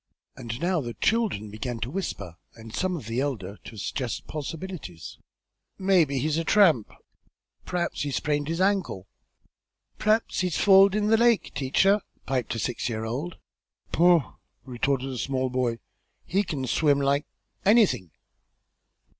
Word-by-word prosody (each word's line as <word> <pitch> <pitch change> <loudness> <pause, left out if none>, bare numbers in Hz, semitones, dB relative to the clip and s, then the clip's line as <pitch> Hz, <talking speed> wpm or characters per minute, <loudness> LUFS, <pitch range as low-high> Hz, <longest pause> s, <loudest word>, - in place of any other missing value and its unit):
And 115 0 -6
now 175 0 +1
the 120 -3 -6
children 205 - 0
began 115 +2 -4
to 120 - -3
whisper, 100 - -4 0.2
and 115 -1 -12
some 185 -1 -1
of 140 - -8
the 115 +4 -1
elder 105 -9 -3
to 110 - -10
suggest 120 +4 -3
possibilities. 150 - -7 0.6
"Maybe 180 -8 +3
he's 150 +4 0
met - - +1
a 165 - -4
tramp." 165 - +4 0.8
"P'r'aps 175 -1 -2
he's 145 -2 -2
sprained 145 -1 -1
his 165 +1 -2
ankle!" 190 - 0 0.9
"P'r'aps 215 +1 +1
he's 180 -2 0
falled 195 0 +6
into 210 0 +1
the 225 - +6
lake, 235 -1 +3
teacher," 195 +10 +2 0.2
piped 130 -3 -1
a - - -3
six 120 +1 -2
year 110 -1 -3
old. 140 +10 -4 0.5
"Poh!" 170 -4 +3 0.3
retorted 130 +1 -1
a 125 - -5
small 130 0 -1
boy. 125 -2 0 0.5
"He 195 +3 +1
kin 145 -9 -3
swim 145 +2 +2
like 140 +1 +1 0.4
anything." 205 - +4
145 Hz, 145 wpm, -26 LUFS, 120-185 Hz, 0.9 s, falled